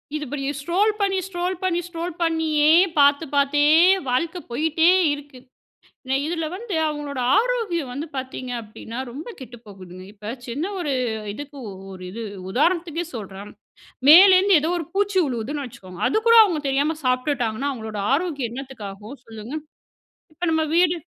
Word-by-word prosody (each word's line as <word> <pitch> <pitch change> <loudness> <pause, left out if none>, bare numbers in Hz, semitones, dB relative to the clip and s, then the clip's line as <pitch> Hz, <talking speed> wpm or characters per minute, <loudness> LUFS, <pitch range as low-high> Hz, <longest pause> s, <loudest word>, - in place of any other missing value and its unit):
இது 300 - -3
இப்ப 290 - -5 0.2
ஸ்க்ரோல் 380 +8 +2
பண்ணி, 390 -1 +1
ஸ்க்ரோல் 360 0 -2
பண்ணி, 350 -2 +1
ஸ்க்ரோல் 340 0 -5
பண்ணியே 315 -2 +2 0.3
பார்த்து, 285 +3 +4
பார்த்தே 290 +1 +3 0.4
வாழ்க்க 330 +8 0
போயிட்டே 320 +5 +2 0.2
இருக்கு. 285 -3 -10 0.9
இதில 325 -1 -2
வந்து 410 -2 -5
அவங்களோட 295 -3 -4 0.2
ஆரோக்கியம் 435 - 0
வந்து 290 +5 -4
பாத்தீங்க 260 -1 -5
அப்டீன்னா, 225 +3 -9
ரொம்ப 295 - -8
கெட்டு 245 -2 -10
போகுதுங்க. 185 -2 -11
இப்ப 210 +2 -7 0.2
சின்ன 295 +11 -3
ஒரு 295 -5 -1 0.4
இதுக்கு 290 +3 -9 0.4
ஒரு 185 0 -10
இது 230 +3 -7 0.3
உதாரணத்துக்கே 335 - 0
சொல்றேன், 200 -1 -8 0.6
மேலேருந்து 375 +3 +8
ஏதோ 320 - -1
ஒரு 330 - -4
பூச்சி 405 -1 0
விழுவுதுன்னு 265 +3 -3
வச்சுக்கோங்க, 185 -6 -12
அதுக்கூட 460 - +3
அவங்க 345 -7 0
தெரியாம 285 +4 +1
சாப்பிட்டுட்டாங்கன்னா 255 -1 0
அவங்களோட 220 -4 -6
ஆரோக்கியம் 285 -7 -1
என்னத்துக்கு 265 -5 -8
ஆகும்? 210 +6 -11
சொல்லுங்க, 225 +4 -9 0.8
இப்போ 340 +3 -6
நம்ம 320 0 +2
வீடு, 350 0 +4
295 Hz, 140 wpm, -22 LUFS, 250-345 Hz, 0.9 s, மேலேருந்து